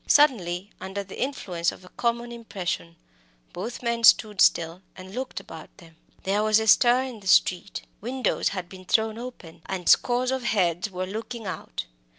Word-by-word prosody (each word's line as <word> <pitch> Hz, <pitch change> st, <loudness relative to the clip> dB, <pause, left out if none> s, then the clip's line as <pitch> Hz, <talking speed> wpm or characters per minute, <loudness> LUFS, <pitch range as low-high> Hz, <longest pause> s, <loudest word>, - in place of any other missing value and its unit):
Suddenly, 200 Hz, -, +3 dB
under 190 Hz, +2 st, -4 dB
the 195 Hz, -, -9 dB
influence 185 Hz, -10 st, -1 dB
of 185 Hz, -, -14 dB
a -, -, -14 dB
common 235 Hz, +2 st, -2 dB
impression, 180 Hz, -, -4 dB, 0.6 s
both 225 Hz, +7 st, -6 dB
men 235 Hz, -1 st, -1 dB
stood 215 Hz, -3 st, +5 dB
still 170 Hz, +2 st, +3 dB, 0.2 s
and 185 Hz, +1 st, -10 dB
looked 255 Hz, +2 st, -4 dB
about 160 Hz, -1 st, -11 dB
them. 165 Hz, -3 st, -16 dB, 0.3 s
There 200 Hz, +2 st, +1 dB
was 215 Hz, 0 st, +4 dB
a 220 Hz, -, -1 dB
stir 245 Hz, +3 st, +5 dB
in 255 Hz, -4 st, -7 dB
the 195 Hz, -, -11 dB
street. 185 Hz, 0 st, +3 dB, 0.2 s
Windows 250 Hz, +1 st, 0 dB
had 185 Hz, -3 st, -5 dB
been 185 Hz, 0 st, -12 dB
thrown 220 Hz, +3 st, +1 dB
open, 175 Hz, -10 st, -10 dB
and 185 Hz, -2 st, -4 dB
scores 250 Hz, +1 st, +4 dB
of 265 Hz, 0 st, -1 dB
heads 195 Hz, -4 st, +1 dB
were 185 Hz, -1 st, -4 dB
looking 220 Hz, +3 st, -6 dB
out. 185 Hz, -, -5 dB
205 Hz, 170 wpm, -26 LUFS, 180-235 Hz, 0.6 s, stood